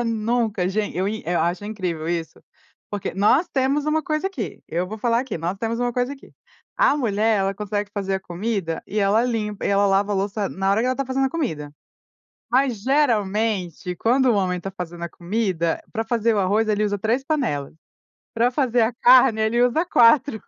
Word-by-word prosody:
acaba -, -, -1 dB
nunca. 225 Hz, -4 st, 0 dB
Gen 210 Hz, +2 st, -2 dB
eu 190 Hz, +3 st, 0 dB
i 220 Hz, +1 st, -4 dB
eu 175 Hz, -1 st, +1 dB
acho 175 Hz, +4 st, -1 dB
incrível 180 Hz, -7 st, -4 dB
isso. 170 Hz, -2 st, -4 dB, 0.5 s
Porque 205 Hz, -3 st, -4 dB
nós 230 Hz, -, +3 dB
temos 275 Hz, +2 st, 0 dB
uma 315 Hz, +1 st, +1 dB
coisa 310 Hz, +5 st, -1 dB
aqui, 240 Hz, -, -5 dB
eu 175 Hz, +3 st, -1 dB
vou 215 Hz, +3 st, -7 dB
falar 235 Hz, +1 st, +1 dB
aqui, 255 Hz, -10 st, -5 dB
nós 175 Hz, +4 st, -3 dB
temos 230 Hz, +2 st, -3 dB
uma 245 Hz, 0 st, 0 dB
coisa 250 Hz, +3 st, -1 dB
aqui. 275 Hz, -, -13 dB, 0.5 s
A 290 Hz, -, +4 dB
mulher, 220 Hz, -4 st, +1 dB
ela 195 Hz, 0 st, 0 dB
consegue 205 Hz, 0 st, -3 dB
fazer 195 Hz, -2 st, -2 dB
a 190 Hz, -, -2 dB
comida, 180 Hz, -2 st, -3 dB
e 210 Hz, -, -3 dB
ela 205 Hz, +3 st, +3 dB
limpa 215 Hz, -4 st, -3 dB
e -, -, +1 dB
ela 200 Hz, 0 st, +3 dB
lava 200 Hz, +1 st, +2 dB
a -, -, +1 dB
louça 200 Hz, +1 st, -1 dB
na 195 Hz, +1 st, -1 dB
hora 205 Hz, +3 st, +2 dB
em -, -, 0 dB
que -, -, 0 dB
ela 255 Hz, -, +2 dB
está 275 Hz, -1 st, -3 dB
fazendo 270 Hz, +1 st, 0 dB
a -, -, -3 dB
comida. 155 Hz, -, -3 dB, 0.8 s
Mas 250 Hz, -4 st, +1 dB
geralmente, 210 Hz, -, 0 dB
quando 255 Hz, +7 st, +2 dB
o -, -, +3 dB
homem 180 Hz, -3 st, 0 dB
tá 195 Hz, -, -5 dB
fazendo 175 Hz, -2 st, -7 dB
a 170 Hz, -, -4 dB
comida, 175 Hz, -2 st, -2 dB
pra 225 Hz, -1 st, -3 dB
fazer 230 Hz, -1 st, +1 dB
o -, -, 0 dB
arroz, 205 Hz, +4 st, +1 dB
ele 210 Hz, 0 st, +1 dB
usa 205 Hz, -1 st, -1 dB
3 235 Hz, +6 st, 0 dB
panelas. 240 Hz, -, -1 dB, 0.6 s
Pra 235 Hz, +2 st, +2 dB
fazer 250 Hz, -4 st, +2 dB
a 225 Hz, +2 st, +1 dB
carne, 245 Hz, -2 st, +5 dB
ele 220 Hz, +2 st, +1 dB
usa 280 Hz, +8 st, +2 dB
4. 240 Hz, -4 st, +4 dB
215 Hz, 210 wpm, -22 LUFS, 195-245 Hz, 0.8 s, carne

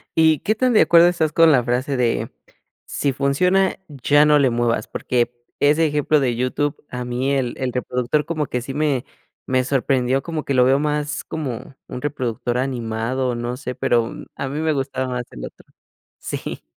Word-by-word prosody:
¿Y 160 Hz, -2 st, +4 dB
qué 215 Hz, -, 0 dB
tan 255 Hz, +2 st, +2 dB
de 215 Hz, -, +6 dB
acuerdo 170 Hz, 0 st, +6 dB
estás 165 Hz, -3 st, +1 dB
con 165 Hz, +1 st, +5 dB
la 130 Hz, -4 st, +4 dB
frase 125 Hz, +3 st, -1 dB
de, 120 Hz, -2 st, 0 dB, 0.5 s
si 140 Hz, -2 st, -1 dB
funciona 180 Hz, +9 st, +2 dB
ya 145 Hz, +1 st, +3 dB
no 150 Hz, 0 st, +5 dB
le 135 Hz, -3 st, +4 dB
muevas? 115 Hz, -2 st, 0 dB
Porque, 120 Hz, -1 st, -1 dB, 0.3 s
ese 150 Hz, +3 st, +4 dB
ejemplo 150 Hz, +1 st, +2 dB
de 125 Hz, -4 st, 0 dB
YouTube, 140 Hz, +4 st, -1 dB
a 125 Hz, -1 st, -5 dB
mí 125 Hz, +3 st, -1 dB
el 130 Hz, -3 st, -1 dB
el 130 Hz, -1 st, -2 dB
reproductor 125 Hz, +3 st, -1 dB
como 155 Hz, -4 st, -2 dB
que 125 Hz, -, -2 dB
sí 135 Hz, +2 st, -6 dB
me 145 Hz, -3 st, 0 dB, 0.4 s
me 130 Hz, -1 st, +1 dB
sorprendió 130 Hz, 0 st, +1 dB
como 160 Hz, -1 st, -4 dB
que 140 Hz, -, -2 dB
lo 125 Hz, -1 st, +5 dB
veo 135 Hz, +1 st, +4 dB
más 150 Hz, 0 st, -2 dB
como 135 Hz, -3 st, -6 dB
un 125 Hz, -, -7 dB
reproductor 125 Hz, -4 st, -2 dB
animado, 125 Hz, 0 st, -2 dB
no 120 Hz, +1 st, -4 dB
sé, 125 Hz, 0 st, -5 dB
pero, 120 Hz, -1 st, +1 dB, 0.2 s
a 140 Hz, -, -4 dB
mí 145 Hz, -, -4 dB
me 160 Hz, 0 st, +1 dB
gustaba 135 Hz, -1 st, -2 dB
más 125 Hz, -1 st, -3 dB
el -, -, -9 dB
otro. -, -, -13 dB, 0.5 s
Sí. -, -, -5 dB
135 Hz, 185 wpm, -21 LUFS, 125-150 Hz, 0.5 s, de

